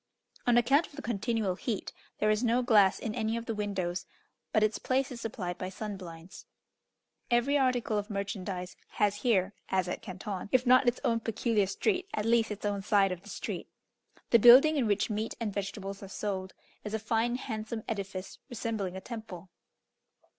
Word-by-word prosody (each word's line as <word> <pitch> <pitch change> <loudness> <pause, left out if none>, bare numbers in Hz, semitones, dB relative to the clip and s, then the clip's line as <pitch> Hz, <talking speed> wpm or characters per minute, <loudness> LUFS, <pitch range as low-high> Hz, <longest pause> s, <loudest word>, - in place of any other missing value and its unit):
On 240 -1 +5
account 270 +7 +4
of - - -21
the 285 - -6
continual 225 -3 0
heat, 210 +3 -4 0.2
there 215 0 +2
is 215 +3 +1
no 240 +1 +2
glass 210 -6 +5
in 220 - -4
any 225 -1 -1
of 230 - -5
the 230 - -2
windows, 190 -4 -2 0.4
but 215 - +3
its 215 0 +1
place 265 +1 0
is 240 -2 -7
supplied 180 -6 -4
by 185 - -3
sun 205 +2 -5
blinds. 170 -1 -11 0.8
Every 240 +4 +3
article 250 -6 +2
of 205 +2 -6
merchandise 195 -3 -4 0.2
has 205 -1 +1
here, 205 -3 +2 0.2
as 185 -1 +1
at 180 - -4
Canton, 190 +1 -6
if 255 0 +3
not 255 +1 +6
its 240 - +2
own 230 -1 +2
peculiar 225 -2 0
street, 370 - 0
at 210 - -1
least 230 -1 +3
its 210 0 -5
own 205 -1 -1
side 195 -1 +3
of 180 -1 -5
the 205 - -13
street. - - -5 0.6
The 235 - +7
building 255 +7 +9
in 265 -6 +1
which 205 +2 +1
meat 215 +1 -2
and 220 -4 -2
vegetables 195 0 -4
are 195 - -7
sold, 190 -1 -4 0.3
is 210 +1 -3
a - - +1
fine 225 +2 0
handsome 220 -3 -4
edifice 195 -3 -5
resembling 220 -5 -3
a - - -7
temple. 195 -6 -8
215 Hz, 185 wpm, -30 LUFS, 195-235 Hz, 0.8 s, building